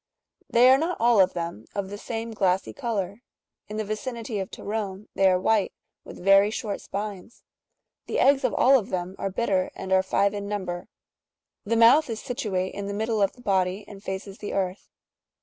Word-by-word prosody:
They 240 +2 +6
are 265 - +6
not 335 +4 -1
all 235 -3 +5
of 185 0 +3
them 170 -10 -5
of 200 -1 -3
the 205 - -5
same 225 +1 -5
glassy 190 -3 0
colour; 215 -5 -3 0.5
in 210 - -6
the 215 - -1
vicinity 220 +1 -4
of 190 - -4
Torone^ 205 -1 -5
they 195 -1 +4
are 185 - +3
white,®'' 210 +1 +1 0.3
with - - -11
very 195 +1 +6
short 210 -2 -4
spines. 205 +2 -6 0.6
The - - -4
eggs^^ 275 0 +4
of - - +1
all 270 +1 +6
of 205 - -8
them 185 +1 -3
are 195 - -1
bitter, 190 -2 0
and 190 - -3
are 190 - +5
five 200 +1 +1
in 200 -1 -4
number; 185 -4 -4 0.8
the 230 +2 +1
mouth 250 +6 +6
is 225 -1 -3
situate 210 -8 -2
in 200 0 -5
the 200 - -4
middle 220 0 0
of 195 - +2
the 245 - -17
body, 190 -1 0
and 200 -2 -11
faces 190 +1 -6
the 205 - -5
earth. 190 0 -2
205 Hz, 195 wpm, -26 LUFS, 190-225 Hz, 0.8 s, They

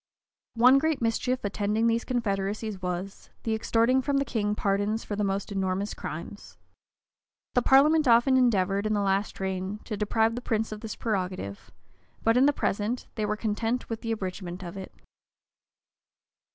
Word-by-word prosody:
One 250 +4 +6
great 315 0 0
mischief 245 +2 0
attending 210 +2 0
these 230 0 +2
confederacies 210 -3 -2
was, 180 +2 -5
the 225 - 0
extorting 230 +3 +2
from 280 +1 0
the 275 - +1
king 210 -4 -1
pardons 205 +2 0
for 205 - -4
the 210 - -1
most 200 +1 -2
enormous 195 +1 -1
crimes. - - -8 1.0
The 245 - +3
parliament 295 +4 +5
often 240 +3 +5
endeavored, 200 -5 +2
in 215 - 0
the 205 - +1
last 195 +1 0
reign, 190 +1 -3
to 215 - -4
deprive 220 +2 +1
the 245 - -4
prince 225 -3 -1
of 215 0 -6
this 220 - -5
prerogative; 185 - -3 0.5
but, 225 0 +3
in 260 +3 +5
the - - +5
present, 225 -2 -2
they 215 -3 -2
were 210 0 -1
content 225 +3 -2
with 225 - -4
an 230 - -2
abridgment 185 -3 -4
of 175 0 -7
it. 190 -1 -7
215 Hz, 165 wpm, -27 LUFS, 195-235 Hz, 1.0 s, One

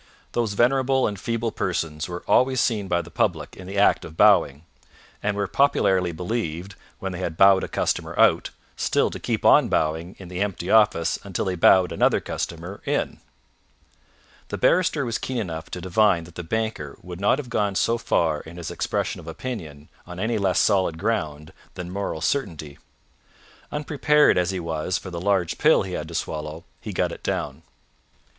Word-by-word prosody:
Those 115 -4 -1
venerable 130 +3 +2
and 100 -2 -3
feeble 115 +1 -2
persons 80 -3 -2
were 90 0 -6
always 130 0 +3
seen 105 -5 0
by 85 -1 0
the 85 - -13
public - - -1
in 95 - -11
the 100 +1 -5
act 100 - +4
of 80 0 -10
bowing, 85 -8 +4 0.6
and 100 -1 -1
were 100 - 0
popularly 95 -10 +2
believed, 90 0 -4 0.2
when 95 - -4
they 90 - -6
had 85 -3 -4
bowed 95 -1 +6
a - - -2
customer - - -2
out, - - +4 0.3
still - - +1
to - - -6
keep - - -2
on - - +6
bowing 80 +3 -1
in 95 - -10
the 90 +2 -5
empty 95 -3 -2
office 105 -7 +3
until 100 -3 -3
they 95 - -1
bowed 90 +1 +5
another - - +2
customer 90 +5 -5
in. - - -1 1.3
The - - -4
barrister 160 -6 +2
was 115 -1 -2
keen 130 - -4
enough 80 -7 -4
to 90 - -5
divine 95 -1 +2
that 85 +1 -14
the 90 - -6
banker 100 -5 -3
would 90 +1 -8
not 100 - +3
have 130 -5 -7
gone 100 -3 0
so 115 +4 +1
far 80 -7 +1
in 85 +2 -12
his 85 - -6
expression - - -2
of - - -12
opinion 80 - -7 0.2
on 90 0 -8
any 110 +2 0
less 95 -2 +1
solid 95 -6 +2
ground 80 -7 -2 0.2
than 90 0 -6
moral 100 -5 -3
certainty. 80 - -2 0.9
Unprepared 150 0 +3
as 90 0 +1
he 95 -1 -2
was 85 +1 -2
for 95 - -8
the 85 -1 -5
large 95 -3 0
pill - - +5
he - - -6
had - - -4
to - - -8
swallow, 75 +1 -4 0.2
he - - -7
got - - 0
it - - -8
down. - - -3
95 Hz, 185 wpm, -24 LUFS, 85-110 Hz, 1.3 s, bowed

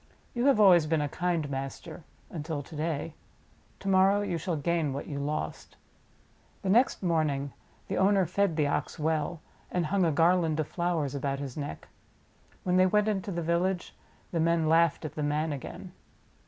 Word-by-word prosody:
You 240 +2 +1
have 275 -6 +4
always 180 -6 +6
been 160 0 +1
a 145 - 0
kind 170 0 -1
master 140 +4 -6 0.3
until 155 -3 -4
to 160 - -12
day. 155 0 -2 0.7
To 195 - -7
morrow 195 +1 +4
you 185 -5 -2
shall 175 +1 -2
gain 160 -1 0
what 140 - -5
you 140 -2 -5
lost." 150 +2 -4 0.9
The 190 - -1
next 240 0 +3
morning 150 -5 0 0.3
the - - -2
owner 195 0 +4
fed 185 0 0
the 150 -2 +2
Ox 145 - -2
well, 160 +1 -1 0.3
and 180 -2 -1
hung 190 +4 +1
a 165 - +3
garland 165 0 +3
of 155 - -1
flowers 170 -6 -1
about 140 0 -2
his 135 -3 -6
neck. 145 -1 -6 0.8
When 180 0 +2
they 185 0 +5
went 210 +2 +2
into 200 -1 -2
the 170 -2 -3
village 175 +2 -1 0.4
the 170 - -1
men 165 0 +2
laughed 165 0 +3
at 150 - -5
the 150 - -4
man 150 +1 0
again. 135 - -8
165 Hz, 180 wpm, -29 LUFS, 150-180 Hz, 0.9 s, always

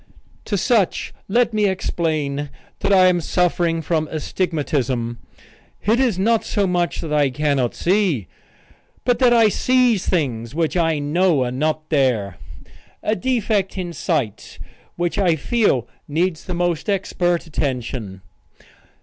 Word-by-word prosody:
To 205 - -1
such 210 -1 +1
let 235 +3 +2
me 210 -1 +2
explain 155 -6 -2 0.3
that 200 - 0
I 185 -2 +6
am 180 -1 +3
suffering 170 -1 0
from 155 0 0
astigmatism. 140 -8 -2 0.7
It 225 +4 +3
is 245 -8 +2
not 225 +4 +2
so 205 - 0
much 175 -4 0
that 160 -3 -4
I 145 -2 +3
cannot 140 -3 0
see, 180 - +1 0.8
but 245 -1 +2
that 250 -2 +5
I 230 -2 +6
sees 250 -3 +2
things 125 -8 -1
which 165 0 0
I 165 -3 +2
know 150 0 +2
are 125 - -2
not 155 +4 -1
there 120 - +1 0.7
a 215 - +1
defect 220 -6 0
in 175 -2 -4
sight 140 - -2 0.4
which 175 +2 -1
I 180 -4 +3
feel 160 - +1 0.2
needs 165 +2 -1
the 180 - -4
most 175 +1 -1
expert 175 -3 0
attention. 125 - -4
170 Hz, 135 wpm, -21 LUFS, 145-195 Hz, 0.8 s, I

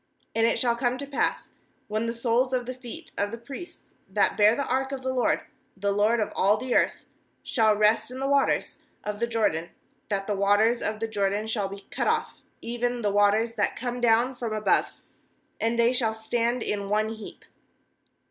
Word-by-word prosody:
nd 225 0 +4
it - - +1
shall 235 -2 +2
come 245 +1 0
to 280 - -5
pass, 280 0 -1 0.4
when 215 +2 -1
the 230 - -1
soles 240 +2 +1
of 250 -1 0
the 255 - -4
feet 245 -2 -10
of 205 - +1
the 230 - -6
priests 270 +9 -10 0.2
that 200 +1 +2
bear 210 +2 +5
the 280 - -1
ark 265 +1 -1
of 265 -1 -5
the 260 0 -1
LORD, 250 -2 +1 0.4
the 200 +1 0
Lord 210 +4 +2
of 210 - -1
all 205 +3 +3
the 250 +3 -3
earth, - - +1 0.4
shall 220 -4 +3
rest 210 +3 +3
in 255 +1 -7
the 270 - -1
waters 280 0 +1 0.2
of 210 0 -4
the 235 - 0
Jordan, 210 -8 0 0.4
that 195 -2 -1
the 205 - -1
waters 205 +4 +3
of 215 0 -2
the 225 - 0
Jordan 205 0 0
shall 220 -3 -1
be 200 0 -9
cut - - -1
off, - - 0 0.2
even 240 0 -2
the 205 - +2
waters 205 +3 +3
that - - 0
come 245 0 -4
down 240 +2 +3
from 235 -3 -4
above; 215 0 +2 0.7
and 230 +1 0
they 235 +1 +4
shall 225 -4 +1
stand 235 +2 0
in 200 -1 -3
one 215 +1 +1
heap.' 220 -1 -9
225 Hz, 200 wpm, -26 LUFS, 210-245 Hz, 0.7 s, bear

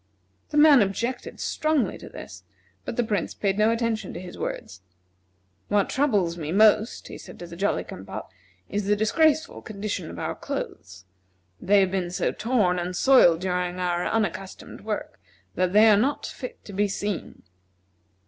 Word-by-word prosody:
The 300 - -2
man 295 -4 +8
objected 235 +6 -2
strongly 310 -4 0
to - - -10
this, - - -10 0.4
but - - -4
the 245 - +3
Prince 210 -3 -2
paid 195 0 -1
no 215 +1 +4
attention 230 -1 -1
to - - -5
his 180 -1 -9
words. 85 - -5 0.9
"What 205 -1 +1
troubles 205 -12 +1
me 155 -1 -4
most," 215 +3 +3
he - - -9
said - - -12
to 175 - -8
the 170 0 -10
Jolly 195 +4 0
cum 95 - -9
pop, 100 +2 -7 0.4
"is 205 0 -2
the 210 - +4
disgraceful 310 +9 +2
condition 200 -5 -5
of - - -9
our - - -3
clothes. 95 - -6 0.6
They 200 +1 +4
have 190 -1 +1
been 185 -2 -1
so 180 - -1
torn 210 -6 +1
and 180 +1 -3
soiled 175 -9 +5
during 180 -1 -1
our 175 -1 0
unaccustomed 195 -3 -3
work - - -5 0.3
that 185 -1 0
they 210 +3 +6
are 210 -2 +6
not 265 +7 0
fit 250 - -8
to 205 - -9
be 205 +2 +1
seen." 200 -1 -4
205 Hz, 170 wpm, -25 LUFS, 180-225 Hz, 0.9 s, man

